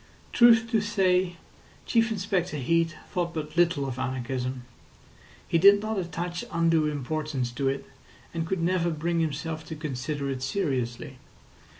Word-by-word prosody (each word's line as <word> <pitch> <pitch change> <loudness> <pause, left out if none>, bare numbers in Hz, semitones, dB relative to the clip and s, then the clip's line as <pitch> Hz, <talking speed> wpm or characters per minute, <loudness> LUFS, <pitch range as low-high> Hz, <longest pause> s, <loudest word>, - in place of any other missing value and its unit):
Truth 230 -1 +6
to 220 -3 +3
say, 185 -3 +1 0.5
Chief 230 -1 +2
Inspector 190 -6 -1
Heat 165 +4 +1 0.2
thought 175 -2 -2
but 155 0 -5
little 170 -5 +3
of 130 -1 -5
anarchism. 130 0 -3 0.8
He 165 - +2
did 200 +3 +8
not 215 -1 -2
attach 175 0 -4
undue 165 -2 +2
importance 145 -2 -2
to 135 +2 0
it, 135 +1 -3 0.5
and 165 -1 -2
could 180 -2 -1
never 175 0 +1
bring 165 +1 -1
himself 160 0 -2
to 160 - -5
consider 145 -1 -3
it 130 -1 -4
seriously. 135 -6 -2
165 Hz, 140 wpm, -27 LUFS, 140-180 Hz, 0.8 s, did